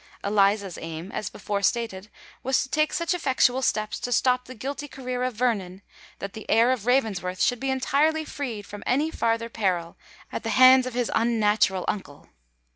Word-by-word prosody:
Eliza's 200 Hz, -2 st, +1 dB
aim, 165 Hz, +3 st, -7 dB
as -, -, -4 dB
before 205 Hz, -1 st, -3 dB
stated, 215 Hz, -2 st, -1 dB, 0.3 s
was 265 Hz, +1 st, +1 dB
to 260 Hz, -, -9 dB
take 305 Hz, +2 st, +1 dB
such 335 Hz, +1 st, 0 dB
effectual 265 Hz, -6 st, +2 dB
steps 215 Hz, -4 st, -1 dB
to 245 Hz, -, -4 dB
stop 250 Hz, +1 st, +2 dB
the 255 Hz, -, -10 dB
guilty 280 Hz, +5 st, -5 dB
career 255 Hz, -2 st, -5 dB
of 250 Hz, -2 st, -1 dB
Vernon, 205 Hz, -5 st, -1 dB, 0.3 s
that 200 Hz, 0 st, -6 dB
the 220 Hz, -, -10 dB
heir 230 Hz, +3 st, +4 dB
of 245 Hz, -4 st, -2 dB
Ravensworth 200 Hz, -8 st, 0 dB
should 245 Hz, -, +2 dB
be 270 Hz, -, -2 dB
entirely 295 Hz, +4 st, +1 dB
freed 240 Hz, -9 st, -5 dB
from 205 Hz, 0 st, -9 dB
any 295 Hz, +6 st, +1 dB
farther 230 Hz, -3 st, 0 dB
peril 185 Hz, -7 st, -2 dB, 0.4 s
at -, -, -4 dB
the -, -, -4 dB
hands 255 Hz, 0 st, +7 dB
of 250 Hz, -, -6 dB
his 245 Hz, -2 st, -1 dB
unnatural 210 Hz, -5 st, +2 dB
uncle. 165 Hz, -8 st, -5 dB
235 Hz, 180 wpm, -25 LUFS, 200-260 Hz, 0.4 s, hands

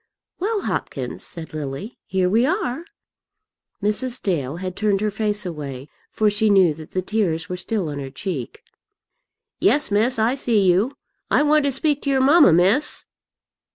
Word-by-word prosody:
"Well, 415 Hz, +3 st, -1 dB
Hopkins," -, -, -4 dB
said 165 Hz, -3 st, -8 dB
Lily, 150 Hz, -, -6 dB
"here 185 Hz, -1 st, +1 dB
we 220 Hz, +6 st, +3 dB
are." 325 Hz, -, -1 dB, 1.0 s
Mrs. 240 Hz, +4 st, -1 dB
Dale 150 Hz, -7 st, -1 dB
had 185 Hz, +1 st, -5 dB
turned 205 Hz, -2 st, +1 dB
her 210 Hz, 0 st, -1 dB
face 210 Hz, -1 st, -1 dB
away, 145 Hz, -5 st, -6 dB, 0.2 s
for 215 Hz, -, +1 dB
she 210 Hz, +1 st, +2 dB
knew 190 Hz, -5 st, +5 dB
that 155 Hz, 0 st, -12 dB
the 185 Hz, -, -1 dB
tears 180 Hz, -5 st, -1 dB
were 180 Hz, -, -3 dB
still 190 Hz, 0 st, -3 dB
on 145 Hz, -1 st, -5 dB
her 135 Hz, -1 st, -6 dB
cheek. 140 Hz, -, -5 dB, 1.0 s
"Yes, 275 Hz, +2 st, +3 dB
miss, 225 Hz, +5 st, +2 dB
I 225 Hz, +3 st, +2 dB
see 235 Hz, -6 st, +1 dB
you. 200 Hz, +10 st, +2 dB, 0.3 s
I -, -, +3 dB
want 300 Hz, 0 st, +3 dB
to 280 Hz, -, +2 dB
speak 290 Hz, +2 st, 0 dB
to 280 Hz, -, -2 dB
your 270 Hz, -1 st, +2 dB
mamma, 290 Hz, -, +6 dB
miss." 195 Hz, -, +2 dB
205 Hz, 165 wpm, -22 LUFS, 175-255 Hz, 1.0 s, mamma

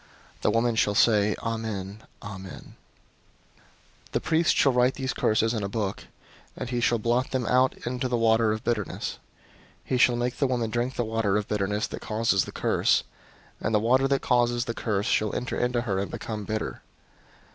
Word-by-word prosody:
The -, -, +2 dB
woman 115 Hz, +2 st, +2 dB
shall 105 Hz, -2 st, +2 dB
say, 105 Hz, -1 st, +4 dB
'Amen, 110 Hz, -3 st, -4 dB, 0.2 s
Amen.' 95 Hz, -2 st, -9 dB, 1.3 s
005:023 -, -, -33 dB
"The -, -, +2 dB
priest 160 Hz, 0 st, +2 dB
shall 135 Hz, -, +5 dB
write 125 Hz, +1 st, +3 dB
these 130 Hz, -2 st, -2 dB
curses 110 Hz, +1 st, +1 dB
in 110 Hz, -, -2 dB
a 100 Hz, -, -2 dB
book, 100 Hz, -2 st, -3 dB, 0.5 s
and 130 Hz, -, -4 dB
he 120 Hz, -1 st, -1 dB
shall 120 Hz, 0 st, +3 dB
blot 120 Hz, +4 st, 0 dB
them 130 Hz, -2 st, -1 dB
out 130 Hz, +2 st, +3 dB
into 125 Hz, +2 st, -2 dB
the 125 Hz, -1 st, 0 dB
water 115 Hz, -1 st, +3 dB
of 110 Hz, 0 st, -3 dB
bitterness. 105 Hz, -5 st, -2 dB, 0.7 s
005:024 -, -, -23 dB
He 130 Hz, -, +3 dB
shall 120 Hz, 0 st, +5 dB
make 120 Hz, +1 st, -2 dB
the 140 Hz, -, +2 dB
woman 120 Hz, -3 st, -1 dB
drink 120 Hz, +3 st, -1 dB
the 120 Hz, -, -1 dB
water 110 Hz, -2 st, 0 dB
of 105 Hz, -, -2 dB
bitterness 105 Hz, 0 st, -1 dB
that -, -, -7 dB
causes 110 Hz, -3 st, +1 dB
the -, -, -8 dB
curse; -, -, +2 dB, 0.6 s
and 110 Hz, -, 0 dB
the -, -, +4 dB
water 130 Hz, +5 st, +3 dB
that 135 Hz, 0 st, 0 dB
causes 120 Hz, -1 st, +2 dB
the 115 Hz, -, -3 dB
curse 105 Hz, -3 st, -1 dB
shall 105 Hz, -1 st, +1 dB
enter 125 Hz, -, -3 dB
into 125 Hz, -1 st, 0 dB
her 100 Hz, -6 st, -1 dB
and 100 Hz, -, -3 dB
become 105 Hz, -2 st, -5 dB
bitter. 110 Hz, +1 st, -3 dB
115 Hz, 190 wpm, -26 LUFS, 105-125 Hz, 1.3 s, shall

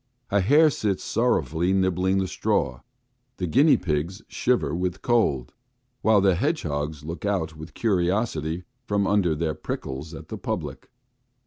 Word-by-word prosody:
A 100 Hz, -, +4 dB
hare 150 Hz, -, +5 dB
sits 105 Hz, -6 st, -1 dB
sorrowfully 85 Hz, +4 st, +1 dB
nibbling 95 Hz, 0 st, +2 dB
the 95 Hz, -1 st, 0 dB
straw. 65 Hz, -7 st, 0 dB, 0.6 s
The 90 Hz, -, -2 dB
guinea 140 Hz, -, +5 dB
pigs 85 Hz, +4 st, -2 dB
shiver 120 Hz, -, 0 dB
with 90 Hz, +2 st, -2 dB
cold, 90 Hz, -, +1 dB, 0.5 s
while 110 Hz, -2 st, +4 dB
the 95 Hz, -1 st, +4 dB
hedgehogs 80 Hz, -, -2 dB
look 80 Hz, +3 st, -6 dB
out 90 Hz, -6 st, -1 dB
with 80 Hz, +1 st, -10 dB
curiosity 90 Hz, -5 st, 0 dB, 0.2 s
from 100 Hz, -2 st, +1 dB
under 95 Hz, -6 st, +2 dB
their 80 Hz, 0 st, -1 dB
prickles 70 Hz, +3 st, -6 dB
at -, -, -11 dB
the -, -, -6 dB
public. -, -, -4 dB
90 Hz, 140 wpm, -25 LUFS, 80-100 Hz, 0.6 s, hare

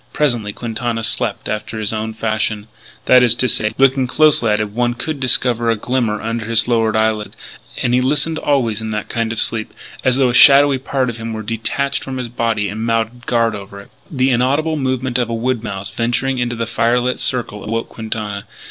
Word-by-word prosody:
Presently 120 Hz, -8 st, 0 dB
Quintana 115 Hz, +1 st, -3 dB
slept 115 Hz, -1 st, -1 dB
after 110 Hz, +1 st, -4 dB
his 110 Hz, 0 st, -1 dB
own 110 Hz, 0 st, -3 dB
fashion 110 Hz, -1 st, -1 dB, 0.4 s
that 125 Hz, 0 st, +6 dB
is 120 Hz, -2 st, +3 dB
to 125 Hz, -, +1 dB
say, 105 Hz, -2 st, +1 dB
looking 135 Hz, -1 st, +3 dB
closely 150 Hz, -4 st, +4 dB
at 105 Hz, -, +2 dB
him 105 Hz, -1 st, -3 dB
one 120 Hz, +1 st, 0 dB
could 150 Hz, +4 st, -4 dB
discover 120 Hz, -2 st, +2 dB
a 115 Hz, -, +3 dB
glimmer 115 Hz, -1 st, -1 dB
under 115 Hz, 0 st, -3 dB
his 115 Hz, 0 st, +3 dB
lowered 115 Hz, -3 st, +1 dB
eyelids. 110 Hz, -1 st, 0 dB, 0.5 s
And 120 Hz, -, +1 dB
he 125 Hz, -, +3 dB
listened 150 Hz, +4 st, 0 dB
always 120 Hz, -7 st, 0 dB
in 110 Hz, -, -4 dB
that 105 Hz, -1 st, -4 dB
kind 115 Hz, -1 st, -1 dB
of 115 Hz, -, -3 dB
sleep. 110 Hz, -2 st, -1 dB, 0.3 s
As 130 Hz, -1 st, +3 dB
though 130 Hz, -1 st, +3 dB
a -, -, -1 dB
shadowy 140 Hz, +1 st, +7 dB
part 130 Hz, -1 st, -1 dB
of 115 Hz, -, -10 dB
him 115 Hz, 0 st, -5 dB
were 110 Hz, 0 st, -5 dB
detached 115 Hz, +6 st, -2 dB
from 135 Hz, -1 st, -5 dB
his 125 Hz, -2 st, -4 dB
body, 115 Hz, -3 st, -1 dB
and 110 Hz, +3 st, -5 dB
mounted 115 Hz, +1 st, -2 dB
guard 115 Hz, -2 st, +2 dB
over 100 Hz, -1 st, -8 dB
it. 100 Hz, -, -15 dB, 0.2 s
The 130 Hz, -2 st, +1 dB
inaudible 140 Hz, +6 st, +1 dB
movement 130 Hz, -3 st, -1 dB
of 120 Hz, -2 st, -1 dB
a 115 Hz, -, -2 dB
wood 120 Hz, 0 st, -1 dB
mouse 100 Hz, -2 st, -5 dB
venturing 120 Hz, +4 st, -1 dB
into 120 Hz, 0 st, -1 dB
the 115 Hz, 0 st, -2 dB
firelit 120 Hz, +2 st, 0 dB
circle 115 Hz, -5 st, -2 dB
awoke 115 Hz, +1 st, -3 dB
Quintana. 110 Hz, -2 st, -5 dB
115 Hz, 205 wpm, -18 LUFS, 110-125 Hz, 0.5 s, shadowy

